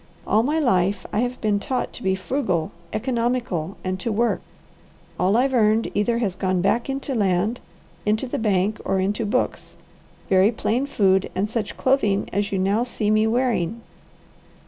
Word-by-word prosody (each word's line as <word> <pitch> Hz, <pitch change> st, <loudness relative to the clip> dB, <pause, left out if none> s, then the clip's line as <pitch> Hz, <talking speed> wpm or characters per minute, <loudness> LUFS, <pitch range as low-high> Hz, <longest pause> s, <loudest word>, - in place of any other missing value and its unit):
All 215 Hz, -, +3 dB
my 295 Hz, +7 st, 0 dB
life 195 Hz, -, +1 dB
I 210 Hz, -, +1 dB
have 245 Hz, +1 st, -1 dB
been 210 Hz, -2 st, +1 dB
taught 250 Hz, +4 st, -2 dB
to -, -, -10 dB
be 190 Hz, -4 st, +1 dB
frugal, 185 Hz, -, -1 dB, 0.2 s
economical, 230 Hz, -, -1 dB
and 185 Hz, 0 st, -2 dB
to 230 Hz, -, -2 dB
work. 230 Hz, +3 st, +1 dB, 0.8 s
All 190 Hz, +4 st, +3 dB
I've 265 Hz, +2 st, +2 dB
earned 220 Hz, -1 st, +3 dB
either 220 Hz, +3 st, +1 dB
has 205 Hz, -6 st, -1 dB
gone 185 Hz, -1 st, 0 dB
back 215 Hz, +8 st, +1 dB
into 270 Hz, 0 st, -3 dB
land, 205 Hz, +1 st, +1 dB, 0.4 s
into 215 Hz, +4 st, +1 dB
the 250 Hz, -, -3 dB
bank, 210 Hz, -1 st, +1 dB
or 195 Hz, -, 0 dB
into 205 Hz, +3 st, -1 dB
books, 250 Hz, +5 st, -2 dB, 0.5 s
very 190 Hz, +3 st, +4 dB
plain 240 Hz, +4 st, -1 dB
food, 190 Hz, -5 st, +2 dB
and 195 Hz, +3 st, 0 dB
such 220 Hz, -1 st, -4 dB
clothing 215 Hz, -7 st, +2 dB
as 200 Hz, +1 st, 0 dB
you 195 Hz, -, 0 dB
now 195 Hz, +4 st, +1 dB
see 220 Hz, -4 st, -1 dB
me 215 Hz, +1 st, +3 dB
wearing. 230 Hz, -3 st, 0 dB
215 Hz, 170 wpm, -23 LUFS, 190-240 Hz, 0.8 s, very